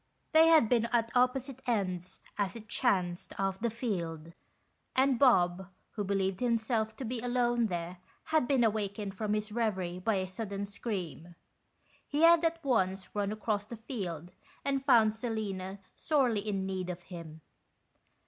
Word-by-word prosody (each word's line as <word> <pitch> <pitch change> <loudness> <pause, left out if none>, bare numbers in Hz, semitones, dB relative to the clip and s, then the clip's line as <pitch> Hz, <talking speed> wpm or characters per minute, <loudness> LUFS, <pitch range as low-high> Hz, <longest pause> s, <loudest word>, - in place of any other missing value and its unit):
They 320 +1 +7
had 320 -8 +6
been 235 0 +2
at 230 -1 +1
opposite 255 +1 +1
ends, 185 -6 -2
as 200 -1 -1
it 220 -1 -10
chanced, 180 -3 -1
of 195 -1 -1
the 235 - 0
field; 170 -9 -4 0.6
and 265 -2 +3
Bob, 185 -8 +4 0.2
who 210 - -3
believed 195 -1 0
himself 225 -2 0
to 265 - -5
be 240 +1 -3
alone 240 -1 +1
there, 175 -1 -4 0.3
had 315 -6 +1
been 265 -3 +3
awakened 205 -2 -1
from 210 +1 -1
his 210 0 -3
reverie 190 -6 -1
by 210 +3 +1
a 185 -1 -1
sudden 200 +1 -4
scream. 180 - -5 0.7
He 295 +3 0
had 335 0 +7
at 330 0 0
once 190 -7 0
run 205 -1 -1
across 215 -1 -2
the 235 - -7
field, 180 - -5 0.3
and 275 -1 0
found 225 -5 +5
Selina 205 -5 -4 0.2
sorely 260 -8 +2
in 195 -2 -1
need 185 -1 -3
of 180 0 -5
him. 165 -3 -9
215 Hz, 155 wpm, -31 LUFS, 190-240 Hz, 0.7 s, They